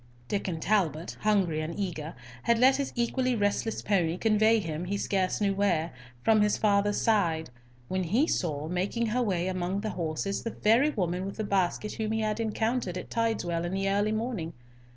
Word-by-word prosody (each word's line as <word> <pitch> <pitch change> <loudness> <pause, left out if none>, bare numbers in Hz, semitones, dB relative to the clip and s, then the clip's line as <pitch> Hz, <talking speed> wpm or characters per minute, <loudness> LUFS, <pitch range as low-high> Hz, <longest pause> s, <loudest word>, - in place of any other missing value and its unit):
Diccon 185 -1 -2
Talbot, 170 -4 0
hungry 190 -7 +2
and 160 +1 -5
eager, 165 -5 -4 0.3
had 235 - +2
let 260 +3 +5
his 280 -1 -2
equally 255 +1 +1
restless 205 +1 -1
pony 180 -4 +1
convey 220 +2 +3
him, 165 -2 -4
he 200 +3 -2
scarce 190 -2 0
knew 200 -2 +2
where, 175 -5 +1 0.3
from 220 -1 +4
his 210 0 +2
father's 205 -1 +2
side, 165 - +1 0.4
when 185 +3 -1
he 225 - +2
saw, 155 - -1
making 190 +7 -1
her 235 +3 0
way 185 -6 0
among 185 +1 -2
the 215 0 -3
horses, 170 +3 -2
the 230 - -3
very 230 +7 +3
woman 180 - -1
with 195 +1 -6
the 220 - -2
basket 200 +1 0
whom 220 0 -2
he 220 - 0
had 215 0 -1
encountered 220 -3 -1
at - - -8
Tideswell 210 -8 0
in 175 +1 -3
the 195 0 0
early 205 +2 +1
morning. 220 -7 -3
200 Hz, 185 wpm, -28 LUFS, 175-220 Hz, 0.4 s, let